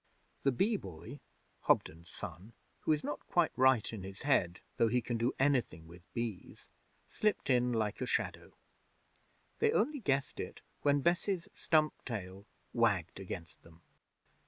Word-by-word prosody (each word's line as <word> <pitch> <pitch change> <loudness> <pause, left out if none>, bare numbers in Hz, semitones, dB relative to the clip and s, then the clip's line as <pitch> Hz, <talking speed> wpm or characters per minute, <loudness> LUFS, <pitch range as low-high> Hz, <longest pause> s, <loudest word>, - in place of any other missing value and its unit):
The 135 - +3
Bee 205 - +2
Boy, 90 - -9 0.5
Hobden's 80 +2 +2
son, 100 +7 -8 0.3
who - - 0
is 150 -1 +2
not 145 - -4
quite 175 -4 +3
right 130 -4 +4
in 110 - -5
his 95 +1 -8
head, 95 -11 +2 0.2
though 115 - +4
he 125 +3 +2
can 120 0 -3
do 115 +3 0
anything 125 - +1
with 85 +2 -15
bees, 115 -6 -4 0.4
slipped 210 -9 0
in 125 0 +3
like 110 -3 -1
a - - -1
shadow. - - -2 1.0
They - - +4
only 285 +6 +1
guessed 140 - 0
it - - -6 0.2
when 145 -1 +3
Bess's 175 +2 +1
stump 155 -1 +2
tail 100 -3 -6 0.3
wagged 100 -8 +1
against 90 -4 -7
them. 85 0 -18
120 Hz, 150 wpm, -34 LUFS, 95-145 Hz, 1.0 s, right